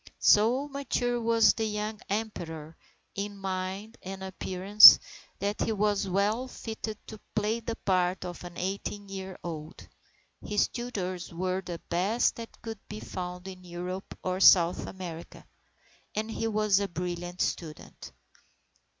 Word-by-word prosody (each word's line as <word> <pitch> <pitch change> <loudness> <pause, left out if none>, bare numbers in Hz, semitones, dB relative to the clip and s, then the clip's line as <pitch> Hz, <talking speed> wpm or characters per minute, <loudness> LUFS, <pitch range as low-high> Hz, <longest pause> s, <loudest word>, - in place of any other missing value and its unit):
So 240 +7 +4
mature 245 -4 -1
was 230 0 +5
the 225 - -2
young 210 0 -3
Emperor 165 -7 -4 0.4
in 200 0 -4
mind 190 +3 -4
and 190 0 -7
appearance, 190 +2 +8 0.4
that 205 +1 -2
he - - +1
was 205 -1 +1
well 210 +7 +1
fitted 220 -3 -6
to 220 - -10 0.2
play 215 +2 +1
the 230 0 -4
part 185 -2 0
of 175 -1 -7
an 175 -1 -9
eighteen 200 +2 -4
year 190 -1 -6
old. 160 -2 -7 0.6
His 210 -1 +1
tutors 185 -8 -4
were 185 +2 -2
the 175 -2 -6
best 190 +7 +1
that 230 0 -10
could 225 -2 -6
be 210 - -6
found 180 -1 -6
in 185 -1 -9
Europe 180 +2 -6
or 185 0 -1
South 175 -2 +6
America, 175 -3 -8 0.7
and 220 +1 -2
he 225 - -2
was 215 -2 +2
a 200 - -1
brilliant 175 0 -5
student. 155 -3 -4
195 Hz, 140 wpm, -29 LUFS, 180-215 Hz, 0.7 s, appearance